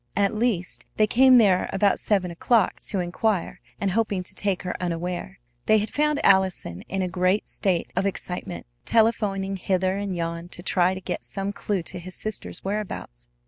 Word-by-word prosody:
At 200 0 +2
least, 215 -5 -1
they 215 - +5
came 255 +3 +6
there 195 -6 +4
about 200 0 +2
seven 190 -4 +1
o'clock 225 +7 +2
to 200 - -1
inquire 180 +2 -1 0.2
and 200 -2 0
hoping 205 -2 0
to - - -10
take 200 -3 -1
her 180 - -3
unaware. 180 +2 -3 0.3
They 215 - +6
had 215 +1 -1
found 300 0 +2
Allison 190 - +3
in 190 0 -1
a - - 0
great 185 +3 +1
state 185 -4 -1
of 190 +2 +1
excitement, 180 -2 -5 0.2
telephoning 200 - +1
hither 185 0 0
and 200 -2 -3
yon 170 0 -4
to 175 - -10
try 185 0 +2
to 190 - -7
get - - -4
some 195 0 -4
clew 200 -3 -2
to 180 +2 -7
his 185 +1 -8
sister's 215 -1 -5
whereabouts. 190 - -5
190 Hz, 180 wpm, -25 LUFS, 180-210 Hz, 0.3 s, came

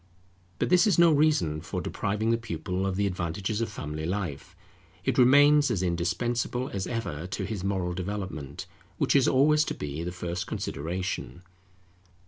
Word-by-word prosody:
But - - 0
this 180 +4 +5
is 200 - +3
no 170 -1 +7
reason 145 - +2
for - - -4
depriving 105 +3 -1
the 115 - +3
pupil 95 -4 -3
of 95 - -1
the 100 +1 +1
advantages 95 +3 -2
of 115 - -1
family 75 -4 -5
life; 90 -7 -4 0.5
it - - +1
remains 145 +3 +6
as 100 -6 0
indispensable 115 +9 -1
as 95 -1 -3
ever 90 -9 -4
to 95 - -4
his 105 -5 -4
moral 95 -3 -1
development, 90 -6 -5 0.3
which - - +1
is 135 -2 +5
always 150 +3 +4
to - - -3
be 75 +2 -5
the 85 +1 -3
first 85 0 -4
consideration. 90 +3 -4
100 Hz, 160 wpm, -27 LUFS, 85-125 Hz, 0.5 s, no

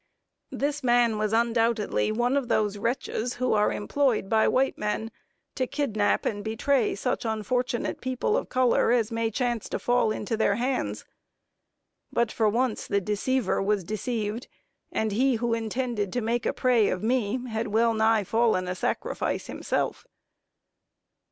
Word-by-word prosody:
This 290 0 -2
man 240 -3 +3
was 215 -1 0
undoubtedly 230 -2 +1
one 240 +4 +1
of 275 -3 0
those 210 -2 +1
wretches 240 +1 -2
who 255 -1 0
are 210 -1 +3
employed 235 -2 0
by 220 -1 +3
white 265 +1 +2
men 215 +2 -3 0.4
to 255 -2 -1
kidnap 220 -9 0
and 205 -1 -2
betray 225 +2 +1
such 200 - -2
unfortunate 235 +2 -2
people 260 - 0
of - - -2
color 255 -2 +3
as 235 -3 +2
may 230 0 0
chance 240 -1 -2
to - - -2
fall 245 -3 +2
into 215 +1 -2
their 215 -2 +2
hands 205 - -2 1.1
but 235 -1 +1
for 220 -2 +2
once 235 +1 -1
the 200 - +1
deceiver 210 +4 0
was 200 -1 +1
deceived, 215 +3 -3 0.4
and 220 -1 -1
he 255 +5 +2
who 235 +1 0
intended 230 -2 -2
to 245 - 0
make 235 +2 -1
prey 245 -4 +3
of 185 - -3
me, 240 0 +1
had 225 0 -2
well 225 +2 +2
nigh 220 -1 +3
fallen 220 -3 +1
a 180 - -1
sacrifice - - -2
himself. - - -3
230 Hz, 150 wpm, -26 LUFS, 210-245 Hz, 1.1 s, man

